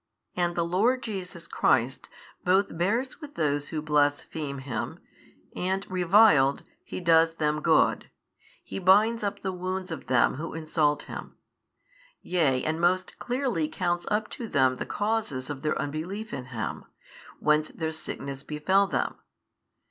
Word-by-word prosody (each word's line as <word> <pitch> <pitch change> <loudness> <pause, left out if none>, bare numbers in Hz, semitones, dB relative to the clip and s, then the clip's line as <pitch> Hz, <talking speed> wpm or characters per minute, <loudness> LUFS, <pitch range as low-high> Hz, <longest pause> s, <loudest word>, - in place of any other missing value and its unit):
And 175 -1 0
the 170 - +1
Lord 225 +9 +2
Jesus 185 -5 -6
Christ 130 +2 +1 0.3
both 190 0 +2
bears 230 - -1
with 295 -1 -10
those 145 -2 0
who 155 -2 -3
blaspheme 145 -1 0
Him 130 -5 -4 0.6
and 190 +2 -1
reviled 180 -7 +5 0.2
He - - -6
does 165 -1 +4
them 150 -1 0
good, - - +3 0.5
He - - -6
binds 210 +5 +4
up 205 -1 -3
the 190 - -1
wounds 185 0 -4
of 160 - -6
them 125 0 +3
who 165 +2 -5
insult 155 -2 +1
Him: - - -8 0.8
yea 145 -8 +1
and 160 +1 -1
most 185 +1 +1
clearly 245 - -1
counts 175 +1 -2
up 210 0 0
to 235 - -6
them 130 -7 +2
the - - -5
causes 205 -12 -1
of 140 -2 -6
their 155 0 0
unbelief 180 +10 -4
in 125 - -4
Him, 120 -4 -5 0.5
whence 150 0 +2
their 160 -1 -3
sickness 140 -3 -6
befell 170 +7 +2
them. - - -1
170 Hz, 145 wpm, -27 LUFS, 150-195 Hz, 0.8 s, reviled